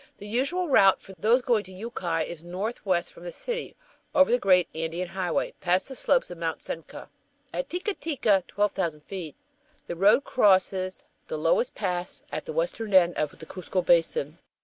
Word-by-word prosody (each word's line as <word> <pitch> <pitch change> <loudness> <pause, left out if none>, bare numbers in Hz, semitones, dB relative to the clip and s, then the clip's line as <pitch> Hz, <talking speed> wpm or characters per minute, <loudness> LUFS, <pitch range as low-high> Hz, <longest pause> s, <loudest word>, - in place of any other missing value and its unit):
The 205 - -10
usual 275 - 0
route 195 -9 +5
for 195 - -13
those 235 +7 +3
going 230 -4 +2
to 190 - -12
Yucay 185 -5 -3
is 170 -2 -8
northwest 185 0 -2
from 170 - -14
the 175 - -6
city, 485 - -4 0.4
over 280 -3 +5
the 245 - +4
great 180 -5 +4
Andean 165 +3 -3
highway, 185 -2 -1
past 180 +1 +1
the 265 - -7
slopes 260 -5 +2
of 175 - -8
Mt. 165 -1 -2
Sencca. 165 - -7 0.5
At - - -3
Ttica 365 +4 -2
Ttica 230 - +1
(12,000 185 -7 -1
ft.) 175 -7 -6 0.5
the 175 - -5
road 205 +9 +5
crosses 190 -5 +2 0.2
the 485 - -3
lowest - - +1
pass 180 -3 -3
at - - -4
the 475 - -5
western 230 - -1
end 175 -2 +6
of 150 -1 -2
the 160 - -10
Cuzco 185 +1 -3
Basin. 165 -2 +2
190 Hz, 175 wpm, -27 LUFS, 175-245 Hz, 0.5 s, end